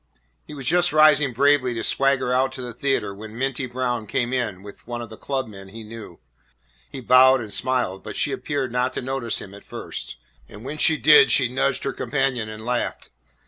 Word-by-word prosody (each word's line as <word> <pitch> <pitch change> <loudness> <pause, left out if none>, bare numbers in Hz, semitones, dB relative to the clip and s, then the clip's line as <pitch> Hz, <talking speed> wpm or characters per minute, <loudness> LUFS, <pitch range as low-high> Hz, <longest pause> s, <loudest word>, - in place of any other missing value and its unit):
He 150 - -9
was 135 -2 -8
just 175 +5 +3
rising 150 -2 +5
bravely 130 -1 +2
to 115 - -3
swagger 135 -1 +2
out 130 +1 +2
to 130 - -7
the 120 -1 -6
theatre 135 -5 -1
when 110 +2 -10
Minty 135 0 -2
Brown 120 -3 -3
came 120 +4 -1
in 105 -7 -2
with 100 +2 -13
one 120 0 -4
of 115 -2 -8
the - - -8
club 135 +2 -3
men 95 -2 -12
he 110 +3 -10
knew. 110 -5 -11 0.7
He 130 - -8
bowed 130 +2 +6
and 110 -4 -5
smiled, 125 -7 0
but - - -8
she - - -1
appeared 135 -4 -3
not 125 +1 0
to - - -4
notice 130 -3 -2
him 100 - -9
at 100 - -13
first, - - -7 0.3
and 105 +4 -12
when 150 +3 -6
she 160 +1 +4
did 150 +1 +6
she 130 -3 +3
nudged 135 +1 0
her 135 - -2
companion 135 -6 -1
and 110 +1 -9
laughed. 125 0 -3
125 Hz, 210 wpm, -23 LUFS, 115-135 Hz, 0.7 s, bowed